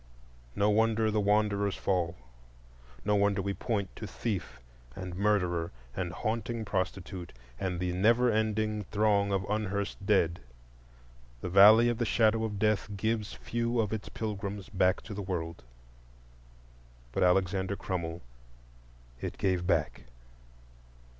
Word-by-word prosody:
No 105 +1 +3
wonder 110 0 +2
the 105 0 +1
wanderers 100 -1 +2
fall! 90 -3 0 0.9
No 105 0 +3
wonder 100 0 +2
we 100 +1 -1
point 100 -3 -3
to 110 - -6
thief 105 - -4 0.4
and 90 -2 -6
murderer, 90 -4 +1 0.3
and 90 -2 -2
haunting 115 +3 -3
prostitute, 95 -2 -3 0.3
and 90 -2 -2
the 90 0 -1
never 115 +6 +4
ending 110 -1 0
throng 100 -1 +2
of 95 -1 +1
unhearsed 100 -1 -2
dead! 95 -5 +2 1.0
The - - -3
Valley 105 +5 +8
of 120 -1 0
the 120 - +1
Shadow 110 0 +3
of 105 -2 -3
Death 105 0 +1
gives 110 0 -1
few 120 0 -2
of 110 -1 0
its 110 - -4
pilgrims 100 -2 -4
back 95 -1 +2
to 110 - -7
the 100 - -4
world. 85 -4 -4 1.5
But - - -2
Alexander 95 +1 +2
Crummell 85 -3 -4 1.0
it - - -4
gave 90 -2 0
back. 80 -8 0
100 Hz, 130 wpm, -30 LUFS, 95-110 Hz, 1.5 s, Valley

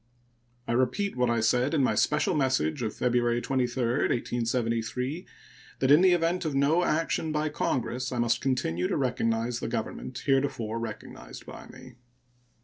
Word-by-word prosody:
I - - -1
repeat 130 +12 0
what 125 -1 +1
I 115 -1 +1
said 125 +6 +2
in 140 - +3
my - - +2
special 150 +6 +1
message 130 - 0
of 110 -2 -3
February 120 -1 +1
23, 130 0 -1 0.3
1873, 120 +4 -2 0.5
that 130 +1 +2
in 150 +4 +7
the 185 -1 +6
event 175 +1 +1
of 155 -4 -2
no 150 +6 +3
action 160 0 0
by 155 0 0
Congress 130 -3 -2
I 125 - -3
must 120 0 +1
continue 90 -10 0
to - - -1
recognize 120 -3 0
the - - -4
government 120 +2 -4
heretofore 135 -5 0
recognized 105 - -8
by - - -10
me. 130 -1 -14
125 Hz, 155 wpm, -28 LUFS, 120-145 Hz, 0.5 s, in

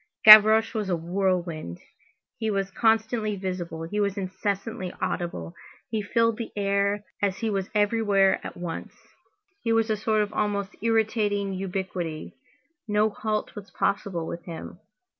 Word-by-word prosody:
Gavroche 215 +1 +9
was 215 -4 -2
a 180 - +2
whirlwind. 170 - -2 0.6
He 220 -1 -1
was 195 -2 -1
constantly 220 0 +1
visible, 180 -4 -5
he 205 +6 -3
was 200 -1 0
incessantly 195 0 -3
audible. 85 - -3 0.4
He 220 -2 -1
filled 230 +2 +1
the 230 - -5
air, 200 0 0 0.2
as 195 -2 0
he 220 +2 -2
was 195 -2 -2
everywhere 205 -2 +3
at - - -8
once. 175 -2 -6 0.7
He 230 - -1
was 225 0 +2
a - - +2
sort 215 0 +1
of 210 +1 -7
almost 205 -1 -2
irritating 215 -3 +1
ubiquity; 185 -4 -4 0.5
no 210 +1 +2
halt 215 +1 -3
was 205 -2 -10
possible 190 -2 -1
with 170 +1 -6
him. 170 +1 -8
200 Hz, 140 wpm, -26 LUFS, 185-215 Hz, 0.7 s, Gavroche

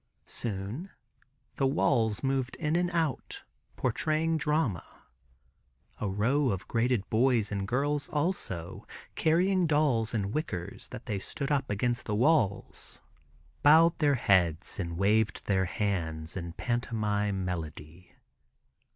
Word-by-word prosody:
Soon 110 - -5 0.7
the 135 - +2
walls 115 -6 +1
moved 135 -1 -1
in 155 -1 -1
and 175 0 +2
out, 165 -5 -2 0.3
portraying 155 +6 0
drama. 150 - 0 1.2
A 105 - -1
row 125 +8 +1
of 95 -3 -3
graded 115 -3 0
boys 115 -2 +2
and 100 -1 -2
girls 145 +5 0
also, 145 - -3 0.3
carrying 180 +3 +2
dolls 140 -8 +2
in 100 -2 -1
wickers 100 - -4
that 125 -1 -9
they 105 -4 -2
stood 140 +8 -4
up 140 -2 0
against 120 +4 -1
the 105 - -1
walls, 115 -5 +1 0.6
bowed 160 +3 +6
their 145 -3 +3
heads 90 -9 +2
and 85 -3 -3
waved 105 +3 +1
their 95 -2 +2
hands 80 -5 -2
in 85 -3 -5
pantomime 105 -4 -1
melody. 85 0 -6
115 Hz, 120 wpm, -29 LUFS, 100-145 Hz, 1.2 s, bowed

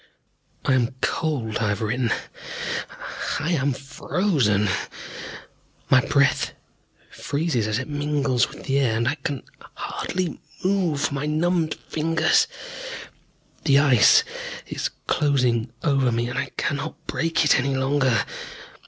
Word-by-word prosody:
I - - +3
am 125 -1 +1
cold, 130 -9 0
I 110 - +1
have 105 - -1
written. 120 +2 0 0.8
Ah, - - -5
I 165 - -1
am 140 -4 +2
frozen. 135 - +1 1.2
My 130 -2 +7
breath 140 -1 +2 0.6
freezes 140 -7 -1
as 110 0 0
it 130 - -3
mingles 145 -4 +1
with - - -11
the 135 0 +1
air, 120 -5 +2
and 115 +1 0
I - - +3
can 145 -3 -4 0.3
hardly 180 -2 -3 0.2
move 175 -8 +1
my 140 +1 -2
numbed 160 +1 +1
fingers. 160 +1 +3 1.2
The 140 -3 +6
Ice 150 - +6 0.4
is - - -2 0.2
closing 125 -6 +2
over 135 -5 +3
me, 120 +1 0
and 120 - -2
I - - -2
cannot 150 +3 -3
break 165 0 +1
it 150 - +5
any 135 +1 0
longer. 130 -4 +2
140 Hz, 125 wpm, -24 LUFS, 125-155 Hz, 1.2 s, My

